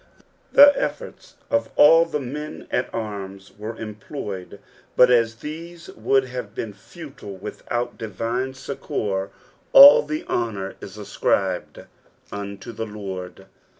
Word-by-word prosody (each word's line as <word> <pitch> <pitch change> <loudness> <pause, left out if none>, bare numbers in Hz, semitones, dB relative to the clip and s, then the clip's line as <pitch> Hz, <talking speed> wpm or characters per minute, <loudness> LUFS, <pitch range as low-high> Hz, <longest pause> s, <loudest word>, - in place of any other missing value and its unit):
Tbe 285 0 +10
efforts - - -5 0.2
of 285 0 +1
all 165 +3 +7
the 160 -3 -3
men 150 +4 -7
at 125 - -1
arms 100 -3 -6
were 110 +2 -7
employed, 105 -3 -7 0.4
but 125 0 +6
as 115 -2 +3
these 165 +6 -9
wonld 130 +4 +1
have 125 -4 -7
been 110 -3 -5
futile 135 - -11
without 120 +5 -5
divine 115 +5 -3
succour, 100 -7 -3 0.4
all 280 +1 +11
the 155 +1 -5
honour 105 -5 -2
is 100 +1 -10
escribed 95 -2 -2 0.5
unto 100 +1 -7
the 110 0 -5
Lord. 95 -3 -7
115 Hz, 120 wpm, -23 LUFS, 100-140 Hz, 0.5 s, all